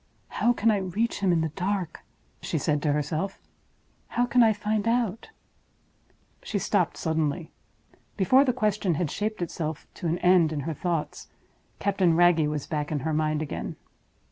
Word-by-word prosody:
"How 240 - +2
can 230 -2 +2
I 210 - +2
reach 200 +5 -1
him 195 -3 +2
in 165 -2 +2
the 160 - -1
dark?" 180 +1 -3 0.4
she - - -2
said 150 -1 0
to 150 - +1
herself. 155 +6 -2 0.7
"How 245 - +1
can 245 0 +3
I 225 -2 +6
find 210 0 -1
out—?" 230 - 0 1.1
She - - -3
stopped - - 0
suddenly. 160 0 -1 0.7
Before 255 +8 +5
the 265 - +2
question 210 -7 0
had 155 -1 -1
shaped 215 -3 -2
itself 160 -2 -4
to 175 - -4
an 165 +2 0
end 180 -3 +4
in 150 -2 -2
her 160 +4 -3
thoughts, 165 0 -3 0.5
Captain 190 -4 +2
Wragge 170 -3 +4
was 150 -2 -3
back 150 -1 -3
in 145 -3 -1
her 160 +2 -1
mind 155 0 0
again. 150 - -5
175 Hz, 170 wpm, -26 LUFS, 155-210 Hz, 1.1 s, I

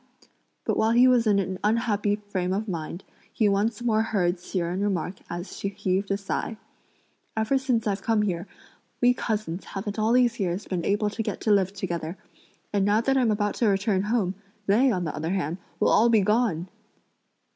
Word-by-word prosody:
but - - +1
while 220 - +2
he 245 +2 +6
was 245 -3 +4
in 205 -2 +4
an 190 -1 -2
unhappy 210 -2 +1
frame 195 -3 -3
of 210 +3 -2
mind, 170 0 -5 0.3
he 215 - +2
once 210 +4 0
more 220 -2 +2
heard 190 -5 0
Hsi 180 - -5
Jen 175 +2 -1
remark 190 -2 -1
as 175 +2 -6
she - - -3
heaved 195 0 -1
a 195 - +1
sigh: 200 +2 -3 0.8
"Ever 220 +5 +2
since 250 -4 0
I've 200 -2 -1
come 220 0 +2
here, 180 -2 -2 0.5
we 245 0 +5
cousins 210 -7 -3
haven't 205 +2 -5
all 220 +2 +2
these 245 -2 +3
years 190 +1 -1
been 180 -3 -3
able 205 +1 +1
to 225 - -3
get - - -3
to 215 - +1
live 195 -2 +3
together, 175 -3 -4 0.6
and 200 -1 +2
now 205 +2 +3
that 270 +3 +1
I'm 250 -4 +3
about 205 -1 +1
to 230 - +4
return 195 -1 +2
home, 205 -3 0 0.3
they, 230 +7 +4
on 185 -7 0
the 160 - -3
other 160 +4 -2
hand, 175 -2 -2 0.2
will - - +3
all 235 +2 +5
be 225 -3 +5
gone!" 205 -5 +1
205 Hz, 195 wpm, -26 LUFS, 185-220 Hz, 0.8 s, he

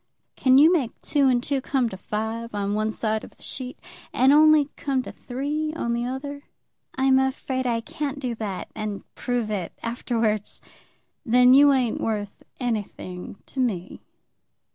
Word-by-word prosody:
"Can 260 0 +4
you 315 +5 +7
make 270 -10 -1
two 285 -2 +2
and 245 -2 +2
two 275 -1 -1
come 260 -2 +1
to 190 - -7
five 220 +3 -4
on 200 0 -1
one 215 +1 0
side 220 0 -1
of - - -13
the - - -15
sheet, 255 -1 -6 0.3
and 265 +3 +4
only 310 -1 +6
come 270 -2 -1
to - - -7
three 290 +5 -3
on 235 -7 -1
the 235 0 -1
other?" 280 +3 -5 0.5
"I'm 265 0 +4
afraid 265 -1 -1
I 230 -1 0
can't 285 +4 -4
do 250 -4 -2
that, 205 -5 -5
and 215 -2 -4
prove 245 -4 -2
it 190 -5 -3
afterwards." 230 -3 -1 0.6
"Then 250 -1 +6
you 285 +1 +7
ain't 255 -4 +1
worth 205 -2 -3 0.2
anything 205 -7 -4
to 270 - -8
me." 195 -8 -2
245 Hz, 165 wpm, -24 LUFS, 220-270 Hz, 0.6 s, you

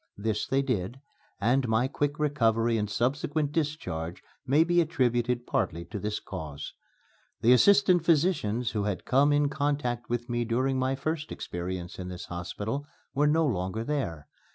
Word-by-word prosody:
This 105 +1 -1
they 135 +1 +2
did, 120 -2 -2 0.4
and 125 +5 +2
my 110 +3 +2
quick 145 +2 -1
recovery 115 -6 +2
and 105 -2 -1
subsequent 140 +6 0
discharge 125 - -3 0.2
may 145 +5 +5
be 175 +1 +3
attributed 125 -6 0
partly 85 +1 -1
to 105 - -6
this 105 +1 -2
cause. 75 -6 -7 0.7
The 120 +3 +6
assistant 185 +3 +5
physicians 145 - +2
who 105 -2 -1
had 100 -3 -2
come 140 +3 +4
in 145 0 +3
contact 140 -5 -1
with 120 0 -2
me 120 -1 0
during 130 +3 0
my 130 +1 +1
first 155 +3 -3
experience 90 0 -5
in 90 - -5
this 90 -1 -7
hospital 105 +10 -4 0.3
were 145 +2 +3
no 160 +2 +3
longer 100 -3 -1
there. 115 - -3
125 Hz, 155 wpm, -28 LUFS, 105-145 Hz, 0.7 s, The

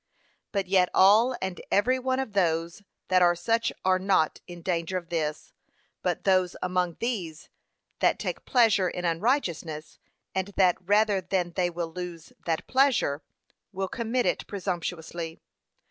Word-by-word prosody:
But 200 -2 -1
yet 185 -1 +3
all 220 +7 +6
and 190 -1 -4
every 255 +6 +3
one 260 0 0
of 265 -6 -3
those 170 -1 0 0.3
that 185 -1 +4
are 175 -1 +5
such 230 +7 0
are 185 0 +3
not 185 -5 +1
in 175 -2 -10
danger 175 +1 -1
of 175 -2 -7
this; 155 -3 -3 0.5
but - - -1
those 185 -2 +2
among 180 -2 0
these 185 -10 -4 0.5
that - - +3
take - - -4
pleasure 220 -7 +3
in 180 +1 -5
unrighteousness, 170 - -1 0.3
and 190 0 -1
that 185 -2 +4
rather 205 +1 +3
than 180 -1 -1
they 175 0 0
will 170 -1 -5
lose 175 -2 -7
that 165 -1 -1
pleasure, 255 - +2 0.5
will 190 -1 -3
commit 235 +4 -1
it - - -1
presumptuously. 170 -3 -4
185 Hz, 145 wpm, -27 LUFS, 170-205 Hz, 0.5 s, all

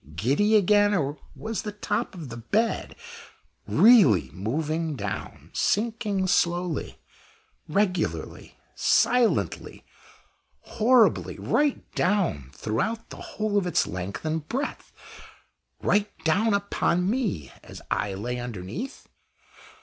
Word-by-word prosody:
giddy 140 - +2
again? 205 0 +4
or 145 -3 -1 0.2
was 225 -1 -4
the 210 - -5
top 210 +1 -2
of 160 -7 -8
the 115 - -7
bed 215 - -1 0.7
really 205 - +6
moving 155 - -2
down 100 -5 -6
sinking 210 -3 0
slowly, 175 -2 0 0.7
regularly, 185 +2 -1 0.2
silently, 235 0 +1 0.8
horribly, 235 +1 +3
right 290 -2 +1
down 180 - 0
throughout 130 - -3
the - - -8
whole 210 -1 -1
of 185 - -3
its 175 - +2
length 90 - -5
and 155 -1 -2
breadth 275 +4 -4 0.9
right 205 0 +2
down 200 +7 +2
upon 180 -3 0
me, 205 - -1
as - - -11
I 100 -2 -1
lay 120 +5 -4
underneath? 120 - -6
180 Hz, 105 wpm, -26 LUFS, -, 0.9 s, really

